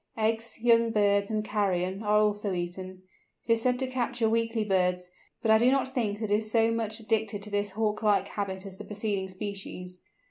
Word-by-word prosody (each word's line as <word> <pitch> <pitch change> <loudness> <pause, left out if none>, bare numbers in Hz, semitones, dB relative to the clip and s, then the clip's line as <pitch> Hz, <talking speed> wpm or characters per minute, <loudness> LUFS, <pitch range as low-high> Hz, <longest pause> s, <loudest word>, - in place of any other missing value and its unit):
Eggs, 225 +1 -1
young 230 0 +4
birds, 200 -2 +2
and 215 -1 -1
carrion, 195 -2 -1
are 210 -1 +2
also 210 -1 +1
eaten. 185 +1 -5 0.4
It 230 - +4
is 225 - +1
said 250 +1 +2
to 260 - 0
capture 245 -2 -1
weakly 225 0 +1
birds, 180 -2 0 0.3
but 220 - +3
I 220 - +6
do 240 +2 +5
not 265 0 +1
think 210 -6 -1
it 210 - -2
is 215 +1 +1
so 225 0 +3
much 225 -1 0
addicted 220 -2 -1
to 210 - -4
this 205 -1 -1
Hawk 215 0 -1
like 210 -2 +2
habit 190 -1 -4
as 190 -1 -9
the - - -8
preceding 205 -2 -3
species. 185 -2 -5
210 Hz, 200 wpm, -28 LUFS, 195-225 Hz, 0.4 s, I